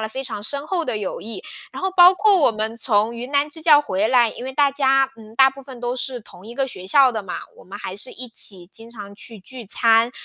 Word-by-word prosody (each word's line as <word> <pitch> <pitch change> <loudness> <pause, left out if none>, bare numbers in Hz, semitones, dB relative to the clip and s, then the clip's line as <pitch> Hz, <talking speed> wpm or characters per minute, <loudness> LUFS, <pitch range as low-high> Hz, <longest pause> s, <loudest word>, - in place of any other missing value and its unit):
了 220 - -3
非 265 +4 -6
常 215 -5 -5
深 280 +6 -4
厚 355 0 -1
的 245 - -2
友 205 -2 -4
谊。 225 +2 -6 0.3
然 - - -9
后 380 - 0
包 360 0 +8
括 405 +2 +3
我 290 - +4
们 220 +1 -3
从 220 -1 +1
云 245 +3 -7
南 285 +1 +1
支 320 +2 -2
教 305 -2 +6
回 215 -7 -1
来， 240 -3 +4
因 - - -9
为 265 - -5
大 285 -1 +3
家， 270 -1 +2
嗯， 220 0 -14
大 265 +2 +6
部 275 +1 -13
分 260 -2 -11
都 245 0 -2
是 255 0 -3
同 190 -1 -15
一 235 - -10
个 270 0 -1
学 185 -7 -8
校 265 +4 +5
的 220 - -4
嘛， 185 - -6 0.2
我 - - -14
们 200 +2 -10
还 185 - -6
是 205 +6 -6
一 250 +1 -8
起 185 -5 -5
经 225 +1 -11
常 205 -3 -10
去 220 +1 -10
聚 240 +3 -11
餐， 225 +2 +3
245 Hz, 285 characters per minute, -21 LUFS, 215-275 Hz, 0.3 s, 包